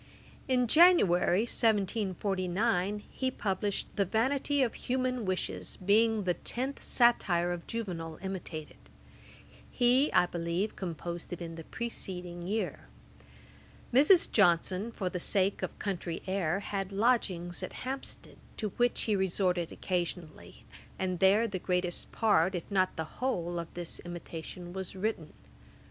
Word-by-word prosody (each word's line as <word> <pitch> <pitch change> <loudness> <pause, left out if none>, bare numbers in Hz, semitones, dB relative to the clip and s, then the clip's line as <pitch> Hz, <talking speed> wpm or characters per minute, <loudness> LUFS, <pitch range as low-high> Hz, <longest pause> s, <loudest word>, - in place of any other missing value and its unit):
In 250 -1 +3
January, 220 - +5
1749, 200 -2 0
he 260 - -1
published 200 -4 -2
The 200 - +3
Vanity 265 +7 +1
of 240 - 0
Human 255 -2 -1
Wishes, 95 - -3
being 215 +3 +3
the 180 -1 +1
Tenth 260 +9 -4
Satire 180 -8 +3
of 175 -1 -5
Juvenal 170 -9 -4
imitated. 175 -5 -6 0.9
He, 255 +4 +3
I - - +5
believe, 175 +4 -2
composed 170 -1 -5
it 170 -1 -6
the 165 - -8
preceding 180 -7 -5
year. 215 +3 -2 1.1
Mrs. 300 +8 +6
Johnson, 185 +2 +3
for 195 -4 -3
the 180 - -3
sake 195 +2 +1
of - - -4
country 175 -4 -3
air, 190 -1 0
had 195 -1 -3
lodgings 195 -5 +1
at - - -6
Hampstead, 265 +1 -6 0.2
to 215 - -2
which 245 0 +2
he 215 - +1
resorted 185 -2 0
occasionally, 175 - -4 0.3
and 185 -2 -2
there 200 +5 +5
the 195 -4 -4
greatest 180 -1 -2
part, 190 -5 +3
if 175 - -3
not 185 -2 +2
the 160 - -2 0.2
whole, 175 -9 -1
of 170 - -6
this 175 -1 -5
Imitation 175 0 -8
was 190 0 -5
written. 190 -5 -3
190 Hz, 130 wpm, -31 LUFS, 175-225 Hz, 1.1 s, Mrs